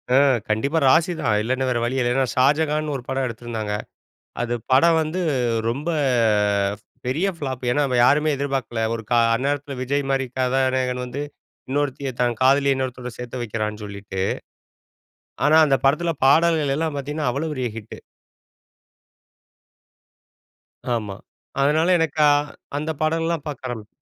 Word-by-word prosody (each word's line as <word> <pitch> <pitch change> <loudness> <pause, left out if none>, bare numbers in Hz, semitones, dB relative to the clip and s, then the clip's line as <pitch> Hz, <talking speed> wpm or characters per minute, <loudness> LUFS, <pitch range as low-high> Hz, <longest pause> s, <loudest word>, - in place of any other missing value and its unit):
அ - - +6 0.3
கண்டிப்பா 140 +9 +1
ராசி 165 +5 +4
தான் 105 -2 +2
இல்லன்னா, 130 +4 -1
வேற 120 -1 0
வழி 120 +3 -1
இல்ல. 125 +2 +2
ஷாஜகான்னு 150 +3 +2
ஒரு 125 - -10
படம் 135 0 -1
எடுத்திருந்தாங்க. 115 -2 -5 0.7
அது 120 0 -1 0.2
படம் 165 +6 +5
வந்து 160 +4 -2 0.5
ரொம்ப 140 +7 -4 1.2
பெரிய 150 +10 0
ஃபிளாப். 130 -4 -5
ஏனா, 145 +4 +2 0.2
யாருமே 150 +4 +4
எதிர்பார்க்கல. 135 -4 -2
ஒரு 115 - -6
கா 120 - +5 0.2
அந்நேரத்தில 140 +2 -2
விஜய் 140 +2 -1
மாரி 135 -1 +1
கதாநாயகன் 130 -1 0
வந்து 125 +3 -5 0.5
இன்னொருத்திய 140 -1 -1
தன் 120 -2 +1
காதலிய 140 +1 +4
இன்னொருத்தவரோட 125 -2 -4
சேர்த்து 125 0 -5
வைக்கிறான்னு 105 -1 -4
சொல்லிட்டு. 100 -2 -6 1.2
ஆனா, 150 +1 +5
அந்த 135 - +3
படத்தில 160 +5 +2
பாடல்கள்லாம் 155 0 +3
பார்த்தீங்கன்னா, 145 0 -2
அவ்வளோ 145 +5 -2
பெரிய 130 -3 -2
ஹிட். 110 -1 -8 3.0
ஆமா. 105 -4 -4 0.5
அதனால, 155 +4 +3
எனக்கு 160 -2 0 0.6
அந்த 155 +2 -2
படம் 160 +1 +1
எல்லா 170 0 0
பார்க்க 140 -3 -5
ஆரம் 110 -4 -6
135 Hz, 125 wpm, -22 LUFS, 120-150 Hz, 3.0 s, அ